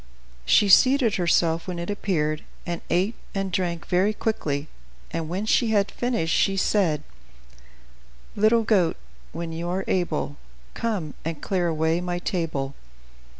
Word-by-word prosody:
She 205 - +5
seated 255 +2 +5
herself 170 -1 +2
when 180 -1 -4
it 170 +3 -3
appeared, 155 -7 -1 0.2
and 170 -1 -3
ate 185 +6 +2 0.2
and 195 -1 -1
drank 175 -2 -1
very 190 +4 +2
quickly, 155 -10 -2 0.4
and 165 -1 -3
when 190 +5 -2
she 230 +2 +3
had 205 -2 +2
finished 230 -10 -1
she 195 0 +2
said: 175 -7 +1 1.3
"Little 220 +2 +4
goat, 190 -7 +2 0.3
when 165 0 -5
you 170 +2 -4
are 190 +2 -2
able, 165 -5 -1 0.4
Come 195 -10 -2
and 165 -2 -4
clear 180 0 0
away 160 +1 +1
my 175 0 -2
table." 165 -7 -2
180 Hz, 140 wpm, -25 LUFS, 165-205 Hz, 1.3 s, She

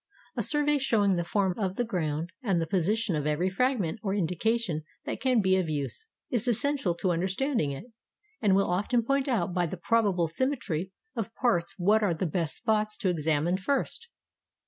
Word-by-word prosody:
A - - 0
survey 295 -1 +2
showing 210 -7 +2
the 175 - 0
form 190 +1 +1
of 190 -2 -1
the 245 - 0
ground, 165 -5 -2
and 195 -8 +1
the 165 - 0
position 195 +3 0
of 150 -1 -1
every 165 +5 +1
fragment 225 -4 0
or 195 -2 -1
indication 195 0 0 0.2
that - - -4
can 255 -4 +3
be 190 -1 +3
of 180 -4 0
use, 150 - -3 0.2
is 240 0 +1
essential 245 -5 +1
to 180 +1 0
understanding 190 - 0
it; 135 - -7 0.6
and 195 -3 +4
will 195 - +3
often 210 +7 +1
point 275 +2 +1
out 200 -9 0
by 175 -1 +1
the 185 - -5
probable 190 -2 +2
symmetry 190 - -2 0.2
of 230 0 -4
parts 175 -9 +1
what 205 +4 +3
are 190 -5 +1
the 170 - -2
best 165 -1 -1
spots 215 -1 0
to 190 - 0
examine 160 +1 +1
first. 280 - -2
190 Hz, 185 wpm, -28 LUFS, 170-230 Hz, 0.6 s, and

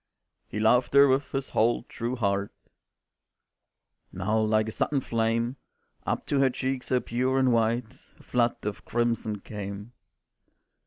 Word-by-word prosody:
"He 105 - -5
loved 120 +5 +3
her 140 0 +8
with 135 +1 +1
his 135 -1 -3
whole 115 +2 +2
true 120 +1 -4
heart," 100 -3 0 1.6
Now 105 +4 0
like 110 0 +2
a - - -3
sudden 140 +5 0
flame 115 +1 -1 0.5
Up - - -1
to 140 - 0
her 135 -1 +4
cheek 130 +1 -2
so 130 0 0
pure 125 +3 0
and 130 -2 +3
white, 115 0 +1 0.3
A - - -17
flood 120 -1 +1
of 105 0 -4
crimson 115 -3 -1
came. 100 +1 -7
115 Hz, 145 wpm, -27 LUFS, 110-130 Hz, 1.6 s, her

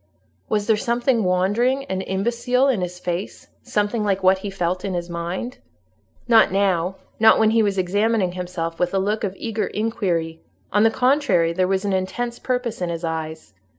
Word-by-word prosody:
Was 210 -1 0
there 220 - +3
something 240 +1 +1
wandering 205 +9 +1
and 190 -4 -3
imbecile 235 +6 +1
in 245 -8 +1
his 180 0 -4
face—something 205 +4 -3
like 195 -2 0
what 190 +1 +4
he 200 - -5
felt 180 -1 -2
in 190 -2 -2
his 175 0 -4
mind? 175 +8 -4 0.7
Not 225 -5 +5
now; 190 -2 +1 0.2
not 220 0 +6
when 220 -1 +4
he 225 0 +4
was 200 -2 0
examining 200 +1 +1
himself 175 -2 -5
with 180 +2 0
a - - +3
look 210 +3 -1
of 195 -2 -2
eager 220 -2 -2
inquiry: 185 -8 -2 0.3
on 205 - +4
the 225 - +6
contrary, 245 - +2
there 185 +1 +1
was 190 +1 0
an 200 - 0
intense 235 +6 -2
purpose 250 -5 -2
in 175 - -1
his 170 0 -4
eyes. 160 -7 -5
195 Hz, 180 wpm, -22 LUFS, 180-225 Hz, 0.7 s, not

